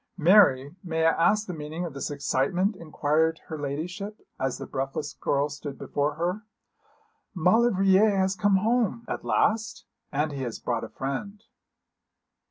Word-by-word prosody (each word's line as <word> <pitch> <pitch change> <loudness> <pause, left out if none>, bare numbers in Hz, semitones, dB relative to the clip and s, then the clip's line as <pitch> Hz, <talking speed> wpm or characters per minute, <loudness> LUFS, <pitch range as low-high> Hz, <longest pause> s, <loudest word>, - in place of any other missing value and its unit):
'Mary, 160 -6 +5
may 160 -2 0
I 165 - +6
ask 210 +7 +2
the 180 - -5
meaning 155 +2 -5
of 165 - -6
this 140 - -4
excitement,' 145 - 0
inquired 160 -1 0
her 155 -2 -5
ladyship, 175 +9 -5 0.2
as 130 -1 -1
the - - -6
breathless 135 +2 -4
girl 140 +1 0
stood 145 -1 -7
before 145 +1 -1
her. 175 +6 -2 0.9
'Maulevrier 195 +2 +4
has 190 -1 +1
come 205 0 +3
home.' 230 +2 +1
'At - - -4
last?' 220 0 0 0.3
'And 150 +2 0
he 140 -2 -5
has 120 -3 -4
brought 115 -2 -2
a 115 - -6
friend.' 200 +11 -5
165 Hz, 150 wpm, -26 LUFS, 145-195 Hz, 0.9 s, I